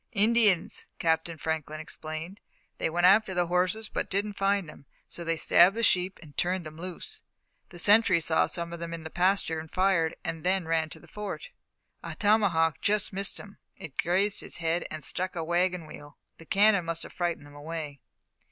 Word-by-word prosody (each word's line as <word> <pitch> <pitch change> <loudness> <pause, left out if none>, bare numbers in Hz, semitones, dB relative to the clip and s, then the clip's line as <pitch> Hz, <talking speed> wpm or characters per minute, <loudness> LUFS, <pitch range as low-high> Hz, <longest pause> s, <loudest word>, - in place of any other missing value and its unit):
"Indians," 210 -4 +3
Captain 165 0 0
Franklin 155 -1 -3
explained. 155 +4 -7 0.4
"They - - 0
went 175 +2 +1
after 195 0 +5
the 175 0 +2
horses, 185 +5 0
but - - -3
didn't 205 +2 -1
find 195 -2 +1
them, 140 -2 -14 0.2
so 170 - -6
they 165 0 -1
stabbed 175 +4 +5
the 230 - -1
sheep 185 -2 +2
and 145 -3 -15
turned 180 -1 -1
them 155 +1 -9
loose. 185 - -5 0.5
The 175 - -12
sentry 200 -1 +5
saw 160 0 +2
some 170 -1 -2
of 170 - -6
them 170 0 -5
in 165 - -9
the 160 - -7
pasture, 180 -2 +1
and 160 0 -9
fired, 185 -3 +2
then 175 +3 0
ran 160 -1 +1
to - - -10
the - - -17
Fort. 210 - -6 0.5
A - - -7
tomahawk 195 -7 +2
just 205 -1 +1
missed 195 +1 -2
him 205 0 -13 0.2
it 150 -5 -10
grazed 195 +4 +1
his - - -8
head 165 0 -1
and 155 0 -6
struck 185 0 -2
a 165 - -2
waggon 175 +1 0
wheel. 145 -1 -12 0.2
The 165 - -14
cannon 200 -3 +4
must 165 0 -3
have - - -11
frightened 175 -4 -2
them 145 - -15
away." 150 -2 -6
175 Hz, 190 wpm, -28 LUFS, 160-195 Hz, 0.5 s, after